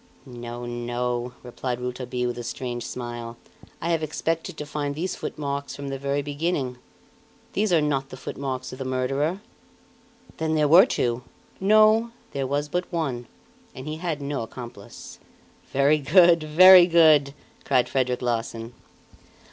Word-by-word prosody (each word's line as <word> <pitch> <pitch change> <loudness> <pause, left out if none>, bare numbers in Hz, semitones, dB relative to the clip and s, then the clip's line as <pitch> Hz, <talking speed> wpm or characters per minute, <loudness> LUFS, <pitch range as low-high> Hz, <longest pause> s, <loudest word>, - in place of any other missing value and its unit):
"No, 120 -1 -7
no!" 120 0 -3
replied 125 0 -4
Rouletabille 125 0 -3
with 120 - -5
a - - -5
strange 120 0 -5
smile. 120 -1 -6 0.4
"I 170 - -2
have 165 -1 +1
expected 160 +2 -3
to 150 - -5
find 145 -1 -3
these 175 +4 -2
footmarks 140 -1 -4
from 140 -1 -6
the 135 0 -4
very 140 +1 -1
beginning. 145 -3 -2 0.7
These 210 -1 0
are 165 -3 +4
not 135 -2 -1
the 130 - -9
footmarks 130 -1 -5
of 130 - -9
the - - -3
murderer!" 135 +8 -1 1.0
"Then 160 0 -1
there 150 -1 +3
were 180 - +8
two?" 120 0 -1 0.4
"No 215 +3 +5 0.2
there 135 -1 -2
was 145 +2 -1
but 180 +4 -3
one, 135 -9 -3 0.5
and 130 +3 -8
he 155 +1 -4
had 160 -4 -3
no 140 0 -3
accomplice." 115 -3 -10 0.5
"Very 140 +3 +3
good! 170 +3 +5
Very 175 +4 +8
good!" 155 -5 +5 0.3
cried 130 -3 +2
Frederic 125 -2 -1
Larsan. 115 -1 -3
140 Hz, 150 wpm, -25 LUFS, 125-160 Hz, 1.0 s, were